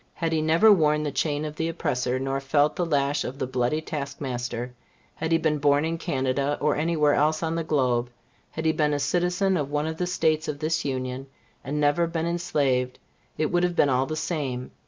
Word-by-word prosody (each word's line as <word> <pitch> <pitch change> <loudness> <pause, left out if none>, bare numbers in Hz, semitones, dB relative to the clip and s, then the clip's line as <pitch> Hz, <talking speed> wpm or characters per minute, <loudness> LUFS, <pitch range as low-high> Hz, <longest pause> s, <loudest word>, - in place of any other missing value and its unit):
Had 165 -2 -1
he 160 - +1
never 165 +8 +5
worn 150 -5 +3
the 145 - -2
chain 145 +1 -1
of 150 0 -6
the 165 0 -1
oppressor, 130 -6 -1
nor 135 +1 -2
felt 145 +2 +2
the 175 - -1
lash 145 -1 +1
of 130 - -5
the 130 - -2
bloody 130 +4 0
task 140 -3 -5
master 125 -2 -4 0.4
had 160 +1 -4
he 165 - +5
been 155 -2 0
born 145 +1 +3
in 165 0 -2
Canada, 135 +1 -1
or 150 - +1
any 165 +2 0
where 150 -1 +4
else 155 +2 +2
on 160 0 -1
the 165 0 -1
globe 125 -6 +1 0.4
had 160 - -6
he 160 - +4
been 150 -2 +1
a - - -1
citizen 180 +6 +1
of 145 -3 -2
one 150 +1 -1
of 160 0 -4
the 180 - -1
States 160 -3 +1
of 150 - -3
this 155 +2 -1
Union, 130 -1 -3 0.4
and 150 +2 -3
never 150 +4 +2
been 165 0 -2
enslaved, 140 -7 0 0.4
it 155 - 0
would 175 - +2
have 175 -1 0
been 145 - +4
all 130 0 +1
the 155 - -3
same. 150 -6 -3
150 Hz, 220 wpm, -25 LUFS, 135-160 Hz, 0.4 s, never